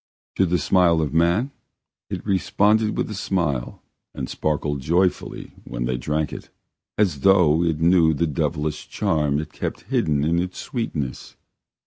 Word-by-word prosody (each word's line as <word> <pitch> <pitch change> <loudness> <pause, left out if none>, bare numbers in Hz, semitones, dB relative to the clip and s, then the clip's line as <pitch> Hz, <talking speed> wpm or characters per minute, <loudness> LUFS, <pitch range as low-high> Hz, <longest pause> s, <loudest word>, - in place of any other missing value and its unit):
To 95 - +3
the 90 +1 +2
smile 85 -3 +3
of 75 -3 -1
man 85 - +2 0.6
it - - -5
responded 105 +2 +2
with - - -1
a - - -3
smile 85 -10 -2 0.3
and 65 - -4
sparkled 75 -2 -2
joyfully 90 +6 0
when - - -4
they 65 +1 -1
drank 75 +5 -2
it, - - -8 0.5
as 95 -9 +1
though 85 -2 +4
it 80 -3 0
knew 85 -2 +4
the 85 - +1
devilish 75 0 -2
charm 75 -8 0
it 75 0 -5
kept - - -4
hidden 75 -2 +1
in 85 +3 +2
its 90 +1 -3
sweetness. 75 - -4
80 Hz, 150 wpm, -23 LUFS, 75-95 Hz, 0.6 s, though